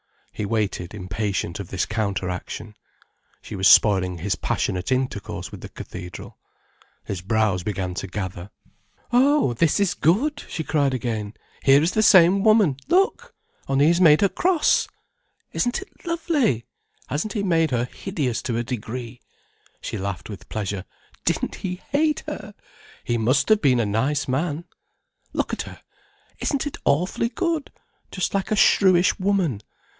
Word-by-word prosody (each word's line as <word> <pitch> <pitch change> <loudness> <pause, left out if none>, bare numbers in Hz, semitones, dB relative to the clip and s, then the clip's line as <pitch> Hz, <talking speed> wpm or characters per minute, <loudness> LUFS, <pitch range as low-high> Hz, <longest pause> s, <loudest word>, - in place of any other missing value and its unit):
He 105 - -3
waited 105 -4 -2
impatient 100 -2 -3
of 100 - -6
this 95 0 -1
counteraction. 100 -1 -3 0.7
She - - -7
was 95 -1 +3
spoiling 95 -1 +5
his 95 +4 -1
passionate 90 +5 -2
intercourse 130 -5 -2
with - - -9
the - - -8
cathedral. 90 0 -9 0.6
His 95 -3 -5
brows 105 -2 +1
began 90 -1 -3
to 100 - -4
gather. 95 -1 -5 0.6
"Oh, 270 - +4
this 155 - +2
is 200 -3 +2
good!" 285 - +1
she 160 - -3
cried 140 -4 +1
again. 110 -3 -3 0.3
"Here 140 +2 +6
is 170 - +2
the 215 - +1
same 190 -2 +6
woman—look!—only 225 - +1
he's 170 +3 +3
made 155 -4 +7
her 200 - +4
cross! 350 - +2 0.7
Isn't 245 +7 0
it 395 - -25
lovely! 305 - 0 0.4
Hasn't 155 +10 -3
he 210 -4 -1
made 165 -4 +2
her 120 -2 0
hideous 140 - -3
to 115 -2 -2
a 120 - 0
degree?" 120 0 -6 0.6
She 110 - -4
laughed 95 -1 -4
with 100 - -10
pleasure. 100 -3 -3 0.4
"Didn't - - 0
he 180 -1 -4 0.2
hate 300 +1 +1
her? 215 -9 -7 0.5
He 120 -1 -1
must 130 +4 +2
have 215 -1 +5
been 130 -5 +4
a 115 - +2
nice 130 +8 0
man! 150 +5 -1 0.7
Look - - -1
at - - -2
her—isn't 280 -1 -6
it 290 - -5
awfully 180 +10 +1
good—just 315 - -4
like 195 -1 -1
a 215 - +2
shrewish 185 -3 +4
woman. 185 - +1
135 Hz, 145 wpm, -23 LUFS, -, 0.7 s, made